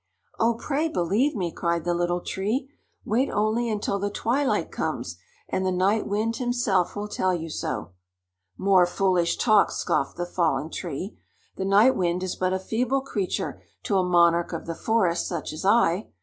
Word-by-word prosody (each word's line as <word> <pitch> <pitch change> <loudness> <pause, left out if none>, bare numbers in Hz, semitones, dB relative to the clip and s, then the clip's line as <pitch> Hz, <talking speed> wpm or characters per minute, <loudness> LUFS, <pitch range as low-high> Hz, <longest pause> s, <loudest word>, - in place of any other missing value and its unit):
"Oh, 230 +1 +3
pray 295 +6 -1
believe 230 - +1
me!" 180 -5 -2
cried 170 -1 -1
the 175 +1 0
Little 175 +1 0
Tree. 230 +11 -2 0.3
"Wait 245 +6 +1
only 220 +3 0
until 205 -2 -1
the 205 +1 -1
twilight 250 +7 0
comes, - - -3 0.3
and 190 - -1
the 185 - +1
Night 195 +4 +1
Wind 220 +3 -1
himself 240 -7 0
will 205 0 -3
tell 185 -3 0
you 165 -1 -5
so." 85 - -4 0.7
"More 190 -2 +4
foolish 180 -2 +1
talk!" 215 -4 +4
scoffed 135 - -1
the 175 - -2
Fallen 160 -4 0
Tree. 175 +3 -5 0.4
"The 190 - -3
Night 205 +7 +5
Wind 180 0 0
is 185 - -3
but 185 0 0
a 190 - +1
feeble 245 +7 -1
creature 205 -8 -3 0.2
to 200 - +1
a - - +2
monarch 170 -1 +3
of 165 - -5
the 165 - -3
forest, 185 -3 +1
such 170 -3 -4
as 155 - -6
I. 200 -2 +3
190 Hz, 175 wpm, -25 LUFS, 175-225 Hz, 0.7 s, Night